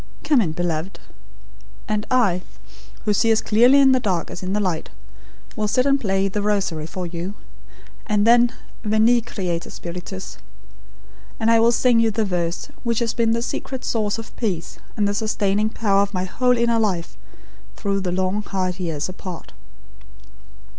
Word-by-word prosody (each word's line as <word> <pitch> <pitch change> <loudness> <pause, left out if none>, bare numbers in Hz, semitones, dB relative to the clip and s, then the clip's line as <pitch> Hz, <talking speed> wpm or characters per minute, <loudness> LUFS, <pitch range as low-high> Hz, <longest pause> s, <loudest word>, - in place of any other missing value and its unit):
Come 290 -6 +4
in, 165 -7 -1
beloved; 175 +1 -3 0.9
and 210 0 -1
I, 200 -9 +2 0.6
who 210 - +2
see 225 +3 +2
as 220 -1 +4
clearly 245 +6 +5
in 270 -1 +6
the 260 - +4
dark 190 -8 -1
as - - -7
in 185 +1 -3
the 210 - +1
light, 180 -5 -2 0.7
will 215 -1 -1
sit 255 +5 +2
and 275 0 +3
play 195 -2 +1
THE 205 +2 -2
ROSARY 195 -7 -1
for 180 +2 -5
you; 175 +3 -5 0.7
and 210 -2 +2
then 240 +1 +5 0.3
Veni, 220 +3 +4
Creator 185 -7 -4
Spiritus; 180 +2 -7 1.0
and 225 0 +3
I 230 - +5
will 230 +1 +5
sing 240 -1 +3
you 230 0 +4
the 220 0 0
verse 175 -3 -2
which 235 -2 0
has 230 -1 0
been 230 -1 +2
the 230 0 -1
secret 260 +1 -4
source 215 -2 0
of 225 - -9
peace, 185 -8 -3 0.2
and 205 -1 +2
the 200 - 0
sustaining 210 -1 0
power 200 -3 +2
of 200 0 -2
my 180 - 0
whole 250 +6 +1
inner 235 -1 +2
life, 185 -6 -1 0.6
through 200 -2 -1
the 180 -2 -2
long, 185 +3 0
hard 185 -2 -3
years, 165 -4 -2
apart." 185 -1 -8
205 Hz, 170 wpm, -22 LUFS, 185-230 Hz, 1.0 s, in